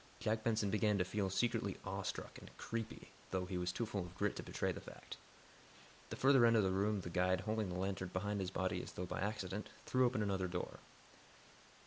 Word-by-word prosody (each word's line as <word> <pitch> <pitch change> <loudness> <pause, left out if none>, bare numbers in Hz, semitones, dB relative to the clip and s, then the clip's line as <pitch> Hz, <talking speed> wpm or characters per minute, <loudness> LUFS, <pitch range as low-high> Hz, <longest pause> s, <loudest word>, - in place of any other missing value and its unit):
Jack 110 0 0
Benson 110 -3 +2
began 105 -1 +3
to 90 - +2
feel 100 0 0
secretly 115 +4 +1
awestruck - - -3
and - - -11
"creepy," 115 -1 -4 0.2
though 95 -1 0
he 90 0 -4
was 90 0 0
too 115 - -1
full 105 -2 -2
of 90 0 -7
grit 100 +2 0
to - - -4
betray - - -1
the - - -6
fact. - - -9 0.9
At - - -23
the - - -4
further 135 -2 +6
end 115 0 +7
of 110 - +5
the 95 - +2
room 100 +2 +2
the 85 - -6
guide, 90 +1 +2
holding 110 0 0
the 90 - -3
lantern 95 0 -1
behind 105 +2 -1
his 95 -2 -1
body 95 -1 0
as - - -8
though 90 - -3
by 90 - -3
accident, 105 0 -2 0.2
threw 130 -1 +4
open 120 -3 0
another 95 -2 0
door. 90 0 -4
100 Hz, 220 wpm, -38 LUFS, 95-110 Hz, 0.9 s, end